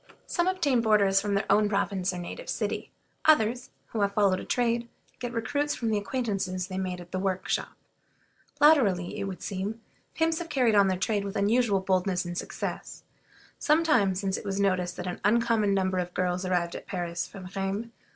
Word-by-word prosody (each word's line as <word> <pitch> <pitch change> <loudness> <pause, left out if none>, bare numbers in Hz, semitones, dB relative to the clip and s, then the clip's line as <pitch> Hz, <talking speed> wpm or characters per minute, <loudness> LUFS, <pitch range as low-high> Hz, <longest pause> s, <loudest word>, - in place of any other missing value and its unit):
Some 345 0 0
obtain 310 -10 +2
boarders 200 -3 +4
from 205 -1 -1
their 200 - 0
own 210 0 +4
province 195 -2 0
or 180 - -6
native 180 - -7
city; - - -2 0.4
others, 245 -5 +3 0.2
who 220 - -2
have 200 0 +1
followed 195 -3 +3
a - - -6
trade, 235 -1 0 0.3
get 245 -1 -4
recruits 285 +6 -1
from 230 -2 -1
the 215 - +2
acquaintances 200 -5 -2
they 185 0 -5
made 185 -1 -3
at 175 0 -12
the 185 - -2
workshop. 190 -1 -1 0.9
Latterly, 225 - +4
it - - -2
would 190 -2 -6
seem, 200 +3 -3 0.4
pimps 325 0 +1
have 340 -1 -6
carried 255 -6 +2
on 200 -1 +5
their 185 -1 +1
trade 205 +2 0
with 200 -1 -5
unusual 205 0 +2
boldness 185 -1 0
and 175 0 -5
success. - - -5 0.6
Some 310 +2 +3
time 220 - +3
since 190 0 -1
it - - -7
was 200 -1 -2
noticed 185 -3 +1
that 180 - -5
an 180 - -5
uncommon 220 0 +3
number 190 -1 +1
of 175 0 -4
girls 180 0 0
arrived 175 -2 0
at - - -8
Paris 175 -3 -3
from 190 -3 -10
Rheims. 195 +4 -2
200 Hz, 190 wpm, -28 LUFS, 185-235 Hz, 0.9 s, on